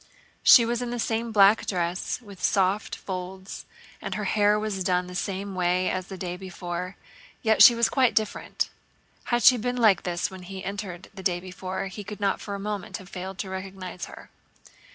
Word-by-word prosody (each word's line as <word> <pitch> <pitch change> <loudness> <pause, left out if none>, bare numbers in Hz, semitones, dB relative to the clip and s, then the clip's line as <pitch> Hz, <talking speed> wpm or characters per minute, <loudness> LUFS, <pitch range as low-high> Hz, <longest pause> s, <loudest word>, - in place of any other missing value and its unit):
She 235 - +8
was 240 +1 -1
in 245 - -3
the 245 - -3
same 230 0 -1
black 205 0 +5
dress 175 -1 -1
with 200 -4 -12
soft 195 +3 +1
folds 190 0 -7 0.3
and - - -4
her - - -3
hair 210 0 +3
was 210 -3 -2
done 180 -1 +1
the 180 - -9
same 195 +2 -3
way 180 0 +1
as 185 0 -3
the 190 - -7
day 180 -1 -4
before, 180 0 -5 0.5
yet 220 -1 +3
she 240 - +10
was 235 0 +3
quite 260 -3 +2
different. 215 -1 -1 0.5
Had 240 0 0
she 255 - +8
been 245 +2 -2
like 220 -6 +5
this 175 0 -2
when 190 -1 -9
he 190 +1 -8
entered 190 -3 -6
the 195 - -9
day 175 -1 +1
before 185 +1 -5
he 195 +2 -7
could 210 +1 -8
not 200 -1 0
for 200 - -5
a - - -6
moment 205 -1 -4
have 190 -1 -13
failed 185 0 -6
to 190 - -4
recognize 190 -1 -6
her. - - -13
195 Hz, 195 wpm, -26 LUFS, 185-210 Hz, 0.5 s, she